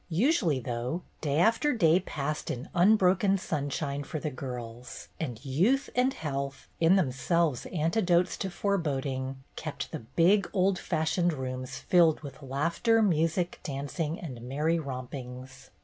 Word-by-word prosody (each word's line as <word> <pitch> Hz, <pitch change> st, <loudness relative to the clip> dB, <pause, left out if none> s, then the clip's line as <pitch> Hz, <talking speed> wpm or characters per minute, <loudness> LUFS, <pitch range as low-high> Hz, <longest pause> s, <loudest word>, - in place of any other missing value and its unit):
Usually, 175 Hz, -, +2 dB
though, 125 Hz, +7 st, -3 dB, 0.2 s
day 145 Hz, -2 st, 0 dB
after 230 Hz, -, +3 dB
day 175 Hz, -6 st, +4 dB
passed 150 Hz, -4 st, -4 dB
in 125 Hz, +3 st, -4 dB
unbroken 195 Hz, +1 st, +4 dB
sunshine 145 Hz, -4 st, -2 dB
for 155 Hz, +2 st, -5 dB
the 150 Hz, 0 st, -3 dB
girls, 125 Hz, -2 st, -7 dB
and 125 Hz, -4 st, -5 dB
youth 190 Hz, -, +2 dB
and 250 Hz, +2 st, +3 dB
health, 140 Hz, -, -4 dB
in 170 Hz, +3 st, +5 dB
themselves 155 Hz, -2 st, +1 dB
antidotes 175 Hz, +1 st, +1 dB
to 195 Hz, -, -3 dB
foreboding, 135 Hz, -9 st, -2 dB
kept -, -, -5 dB
the -, -, -4 dB
big 170 Hz, -, +2 dB
old 190 Hz, -1 st, +2 dB
fashioned 160 Hz, +1 st, 0 dB
rooms 130 Hz, -1 st, -5 dB
filled 170 Hz, -3 st, +4 dB
wih 140 Hz, -2 st, -7 dB
laughter, 165 Hz, -, +1 dB
music, 170 Hz, -1 st, +1 dB
dancing, 150 Hz, +3 st, -3 dB
and 130 Hz, -8 st, -7 dB
merry 150 Hz, +7 st, 0 dB
rompings. 130 Hz, -1 st, -7 dB
155 Hz, 135 wpm, -29 LUFS, 135-180 Hz, 0.2 s, in